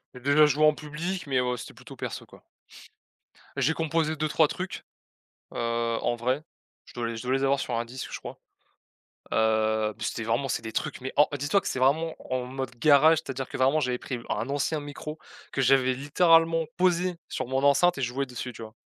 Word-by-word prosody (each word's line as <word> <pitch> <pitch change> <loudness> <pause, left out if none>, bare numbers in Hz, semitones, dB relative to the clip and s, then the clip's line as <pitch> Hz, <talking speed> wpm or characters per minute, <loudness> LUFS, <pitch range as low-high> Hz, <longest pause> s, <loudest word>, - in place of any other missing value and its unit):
J'ai 125 - -10
déjà 140 +3 +5
joué 150 +2 +2
en 155 0 +6
public, 165 +4 -5
mais, 130 -2 +1
ouais 125 0 0
c'était - - -9
plutôt - - -13
perso, - - -6
quoi. - - -17 1.1
J'ai 160 - +2
composé 160 -1 0
2-3 155 +1 +3
trucs, 185 +3 -5 0.7
heu, - - -5 0.4
en 120 - +1
vrai, 130 +5 -1 0.4
je - - -16
dois 120 -1 -2
les 115 0 -4
je 115 - -6
dois 125 +1 -2
les 135 +1 +1
avoir 140 0 +3
sur 120 - -3
un 115 +1 0
disque 130 +2 -7
je - - -4
crois, - - -9 1.0
heu, 110 -1 +2
p - - -7
c'était 115 - -2
vraiment 115 +5 0
c'est - - -1
des 110 - -5
trucs - - -3
mais 130 - -5
oh, 145 - +6
dis-toi 145 +8 +1
que - - -6
c'est - - -2
vraiment 155 +5 +2 0.2
en 125 -1 -1
mode 130 0 -5
garage. 155 +2 +6
C'est-à-dire 135 -4 -5
que - - -5
vraiment 135 +4 +3
j'avais 125 -3 -1
pris 125 - -4
v 115 - -11
un 125 - -2
ancien 145 +2 0
micro 145 +2 -7 0.3
que 135 - -1
j'avais 130 0 +4
littéralement 165 +3 +3
posé 180 0 +2
sur - - -3
mon 135 +1 -1
enceinte 140 +4 +4
et - - -2
je 120 - +1
jouais 135 +3 -2
dessus, 125 -1 -6
tu 115 - -9
vois? 110 0 -10
140 Hz, 215 wpm, -27 LUFS, 125-155 Hz, 1.1 s, en